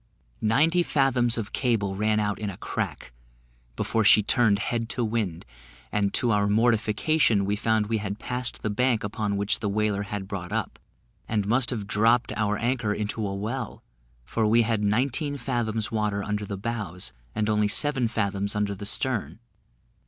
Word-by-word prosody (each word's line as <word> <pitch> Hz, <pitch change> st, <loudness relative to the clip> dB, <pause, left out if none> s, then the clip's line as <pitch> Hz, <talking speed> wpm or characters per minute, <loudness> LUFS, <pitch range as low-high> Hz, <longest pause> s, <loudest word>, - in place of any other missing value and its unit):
Ninety 155 Hz, +11 st, +3 dB
fathoms 130 Hz, -7 st, +2 dB
of 110 Hz, 0 st, -4 dB
cable 110 Hz, -6 st, 0 dB
ran 105 Hz, +1 st, +1 dB
out 105 Hz, -1 st, -1 dB
in 105 Hz, -1 st, -3 dB
a 95 Hz, -, -7 dB
crack, 65 Hz, -, -4 dB, 0.6 s
before 110 Hz, -, 0 dB
she 105 Hz, 0 st, +6 dB
turned 110 Hz, -2 st, +3 dB
head 115 Hz, +2 st, -2 dB
to 120 Hz, -1 st, -1 dB
wind; 105 Hz, -7 st, -2 dB, 0.5 s
and, 100 Hz, -1 st, +1 dB
to 120 Hz, -, +2 dB
our 100 Hz, -1 st, +2 dB
mortification, 110 Hz, +2 st, +2 dB
we 100 Hz, +1 st, 0 dB
found 110 Hz, 0 st, +1 dB
we 110 Hz, +1 st, -1 dB
had 100 Hz, -1 st, -4 dB
passed 125 Hz, +2 st, -3 dB
the 110 Hz, -, -1 dB
bank 125 Hz, +1 st, +1 dB
upon 105 Hz, 0 st, -2 dB
which 100 Hz, 0 st, +1 dB
the 105 Hz, -, -2 dB
whaler 105 Hz, 0 st, 0 dB
had 100 Hz, -1 st, -5 dB
brought 95 Hz, -3 st, -6 dB
up, -, -, -3 dB, 0.5 s
and 105 Hz, -3 st, 0 dB
must 120 Hz, +4 st, +2 dB
have 110 Hz, -5 st, -3 dB
dropped 115 Hz, +3 st, +2 dB
our 105 Hz, 0 st, 0 dB
anchor 115 Hz, -3 st, 0 dB
into 105 Hz, 0 st, -2 dB
a 100 Hz, -, -4 dB
well, 115 Hz, +3 st, -4 dB, 0.4 s
for 110 Hz, -, 0 dB
we 115 Hz, +2 st, +4 dB
had 110 Hz, -1 st, 0 dB
nineteen 130 Hz, +7 st, 0 dB
fathoms 115 Hz, -4 st, -2 dB
water 105 Hz, -2 st, -1 dB
under 105 Hz, 0 st, -2 dB
the 100 Hz, -, -4 dB
bows, 100 Hz, -5 st, -4 dB, 0.2 s
and 105 Hz, -1 st, 0 dB
only 105 Hz, -1 st, +2 dB
seven 135 Hz, +2 st, +4 dB
fathoms 100 Hz, -3 st, -1 dB
under 105 Hz, -1 st, 0 dB
the 100 Hz, +1 st, -6 dB
stern. 105 Hz, -, -1 dB
110 Hz, 175 wpm, -26 LUFS, 100-120 Hz, 0.6 s, she